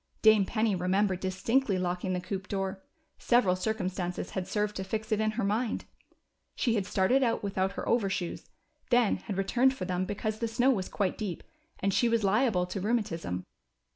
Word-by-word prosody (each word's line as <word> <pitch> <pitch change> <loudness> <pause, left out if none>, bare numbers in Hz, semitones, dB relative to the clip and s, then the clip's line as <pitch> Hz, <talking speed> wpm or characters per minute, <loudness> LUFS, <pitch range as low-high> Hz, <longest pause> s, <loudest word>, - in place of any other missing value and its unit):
Dame 215 -2 +6
Penny 220 -1 +1
remembered 185 +1 +1
distinctly 195 +4 +1
locking 180 +1 -1
the 180 - 0
coop 190 +1 -5
door; 195 -1 -3 0.4
several 230 -7 +3
circumstances 185 -3 -2
had 185 -2 -3
served 210 0 -1
to 190 - -2
fix 215 +3 -4
it 215 0 +2
in 215 - +2
lier 235 - 0
mind. 220 +4 -1 0.7
She 235 - +1
had 200 -4 0
started 205 +9 +3
out 230 -4 +1
without 195 -1 -1
her - - -5
overshoes, 195 -6 -1 0.4
then 240 -4 +4
had 200 - -6
returned 250 +7 +3
for 185 - -4
them 180 0 -1
because 215 +2 -3
the 230 - 0
snow 245 +4 +3
was 190 -7 -1
quite 195 -3 -1
deep 200 -6 -4 0.4
and 195 0 +1
she 240 - +3
was 230 -2 +1
liable 200 -2 +2
to 185 +2 -5
rheumatism. 180 - -1
200 Hz, 180 wpm, -29 LUFS, 185-225 Hz, 0.7 s, Dame